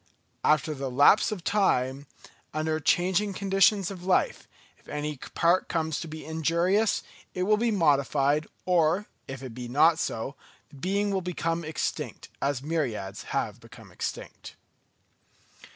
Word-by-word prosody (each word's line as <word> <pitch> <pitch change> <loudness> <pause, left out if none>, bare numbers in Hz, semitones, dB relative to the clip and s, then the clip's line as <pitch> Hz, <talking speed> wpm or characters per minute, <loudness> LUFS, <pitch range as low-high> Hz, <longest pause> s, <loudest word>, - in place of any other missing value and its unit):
After 155 0 +3
the 135 -2 -4
lapse 145 - +5
of 195 -5 -5
time, 140 -10 +1 0.5
under 155 0 0
changing 185 +5 +2
conditions 195 0 +3
of 180 -2 -8
life, 185 0 +1 0.3
if - - -27
any 150 0 -3 0.2
part 170 +2 +3
comes 160 -2 -1
to 170 - -6
be 155 0 -8
injurious, 170 +7 +1 0.3
it 180 - 0
will 215 +3 +4
be 235 +2 +1
modified; 145 - +2 0.2
or 175 +2 +2 0.2
if 135 0 -7
it 130 -3 -7
be 125 0 -6
not 155 +6 +4
so, 115 -1 -3 0.4
the 140 - -15
being 200 +6 0
will 190 -1 0
become 170 -2 -2
extinct, 155 -1 -4
as 140 -2 -1
myriads 125 -12 -3
have - - -2
become - - -15
extinct. - - -6
160 Hz, 140 wpm, -27 LUFS, 145-185 Hz, 0.5 s, lapse